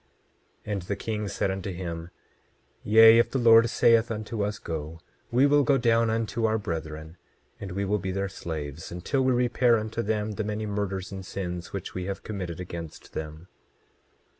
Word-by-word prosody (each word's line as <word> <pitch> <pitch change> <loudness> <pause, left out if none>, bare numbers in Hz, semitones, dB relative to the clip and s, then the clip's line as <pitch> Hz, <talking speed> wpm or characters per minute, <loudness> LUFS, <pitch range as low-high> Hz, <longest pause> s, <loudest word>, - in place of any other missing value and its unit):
27:8 105 - -5
And 100 - -2
the 95 +4 -3
king 105 -1 -3
said 100 0 -1
unto 95 +1 -4
him: 85 -2 -5 0.7
Yea, 110 +2 +8
if 115 - +3
the - - -1
Lord 115 -1 +6
saith 115 +1 +4
unto 110 -1 -3
us 105 +1 -2
go, 80 -2 -6 0.3
we 125 +4 +4
will 145 0 +5
go 140 -1 +3
down 115 -2 +3
unto 115 0 -1
our 110 0 +1
brethren, 80 -3 -5 0.4
and 95 -3 -6
we 100 +1 -1
will 105 +2 0
be 95 - -4
their 100 +1 -1
slaves 80 -5 -6
until 90 +11 -1
we 130 0 +3
repair 120 -1 +3
unto 110 +1 -3
them 110 0 -1
the 110 +1 -3
many 105 +1 -3
murders 100 -2 -3
and 95 -1 -6
sins 90 -2 -5
which 100 -2 -6
we 90 -1 -4
have 100 0 -5
committed 90 -6 -5
against 85 -3 -8
them. 80 +2 -6
100 Hz, 185 wpm, -27 LUFS, 90-115 Hz, 0.7 s, Yea